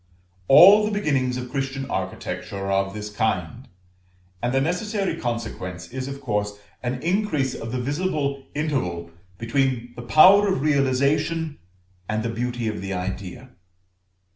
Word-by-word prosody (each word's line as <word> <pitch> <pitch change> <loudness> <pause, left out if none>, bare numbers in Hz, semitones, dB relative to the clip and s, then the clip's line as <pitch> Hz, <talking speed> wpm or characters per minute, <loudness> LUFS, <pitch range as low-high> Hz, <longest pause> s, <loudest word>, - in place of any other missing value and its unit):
All 195 +9 +9
the 210 - 0
beginnings 140 -11 0
of 125 -1 -6
Christian 135 -1 -3
architecture 100 - -4
are 95 0 -3
of 95 +1 0
this 105 0 -6
kind, 110 - -2 0.7
and 120 - 0
the 135 - +2
necessary 190 +5 -1
consequence 110 - -5
is 130 +1 -5
of 140 0 -7
course 105 -5 -2 0.2
an 125 +1 -3
increase 170 -7 0
of 115 - -6
the 125 - -2
visible 140 0 -2
interval 90 - -2 0.3
between 120 +1 -1
the - - -7
power 185 - +7
of 190 -9 0
realisation 145 +3 +1 0.5
and 110 +1 -1
the 115 - -2
beauty 120 0 -2
of 105 -2 -3
the 95 0 -4
idea. 95 +7 -5
130 Hz, 140 wpm, -23 LUFS, 110-150 Hz, 0.7 s, All